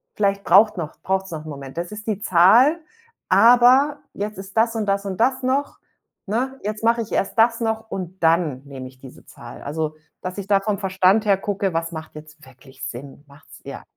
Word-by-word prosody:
vielleicht 200 -1 0
braucht 210 +4 +5
noch 160 -3 -5
braucht's 190 0 -1
noch 155 -1 -7
'n - - -8
Moment. 140 -1 -9
Das 175 +2 -4
ist 210 +1 -9
die 210 -2 -2
Zahl, 225 - +5 0.5
aber 250 +5 +5
jetzt 210 0 -5
ist 195 +2 -10
das 230 +1 +2
und 215 -2 -2
das 200 0 0
und 190 -2 -4
das 260 +2 +1
noch, 270 +3 -1 0.5
ne? 260 +6 -2
Jetzt 210 +2 -4
mache 230 +1 +2
ich 225 - -7
erst 195 - -1
das 230 +1 +4
noch 220 0 -2
und 185 -2 -6
dann 160 -5 +2
nehme 135 -2 -8
ich 130 0 -16
diese 130 -1 -14
Zahl. 120 0 -12
Also, 155 +1 -3 0.3
dass 185 +2 -6
ich 200 - -7
da 200 -1 +3
vom 205 -1 -2
Verstand 190 +2 +2
her 195 -2 +4
gucke, 195 -2 -2
was 165 0 -2
macht 160 -2 -9
jetzt 150 0 -13
wirklich 130 +1 -16
Sinn? 140 +3 -9
Macht's 140 +1 -17
eher - - -9
195 Hz, 205 wpm, -21 LUFS, 160-220 Hz, 0.5 s, braucht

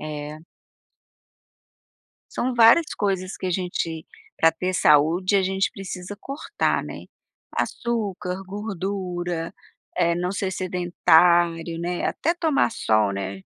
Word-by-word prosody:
É. 150 0 -6 1.9
São 250 0 -2
várias 235 +8 +7
coisas 190 -2 -1
que 185 - -5
a - - -1
gente, 170 -3 -3 0.3
pra 165 0 +4
ter 185 +3 -3
saúde, 165 +7 +3
a 195 - +3
gente 190 +1 0
precisa 185 0 -7
cortar, 275 +3 -2
né. - - -9 0.5
Açúcar, 195 -5 -2
gordura, 185 -4 -4 0.4
eh, 170 -1 +2
não 180 +1 -2
ser 195 -1 -2
sedentário, 175 -2 +2
né, 175 +1 -2
até 335 +3 0
tomar 320 -8 +1
sol, 110 - +1
né. 95 0 -5
180 Hz, 115 wpm, -24 LUFS, 165-195 Hz, 1.9 s, várias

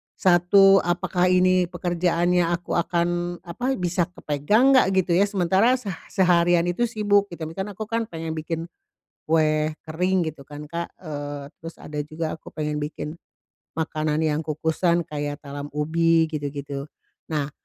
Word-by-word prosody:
1 195 +2 +5
apakah 175 +1 0
ini 185 0 +3
pekerjaannya 175 0 +1
aku 175 0 -3
akan 175 0 0
apa, 245 +10 -2
bisa 175 0 0
kepegang 205 - +2
nggak, 255 -7 +6
gitu 185 -1 +2
ya 195 +4 +4
sementara 195 +5 +3
seh 220 -6 -5 0.2
seharian 175 -2 +3
itu 175 +8 0
sibuk 205 -2 +2
gitu 170 -2 -7
ya, - - -3
misal 190 +3 -4
aku 215 - -4
kan 230 0 -2
pengen 165 -1 -5
bikin, 160 +1 -4 0.6
kue 155 -1 +2
kering 180 +2 0
gitu 145 -3 -12
kan 150 +1 -9
Kak, 170 0 -4
eee, 145 -3 -6
terus 165 +1 -9
ada 150 0 -7
juga 155 +2 -4
aku - - -14
pengen 150 -1 -3
bikin, 150 +1 -5 0.6
makanan 155 -1 -1
yang 155 -1 +1
kukusan 160 +3 +1
kayak 145 -1 -4
talam 140 0 -6
ubi 165 +2 +3
gitu-gitu. 145 -1 -4 0.4
Nah, 150 -3 -2
170 Hz, 150 wpm, -24 LUFS, 155-180 Hz, 0.6 s, nggak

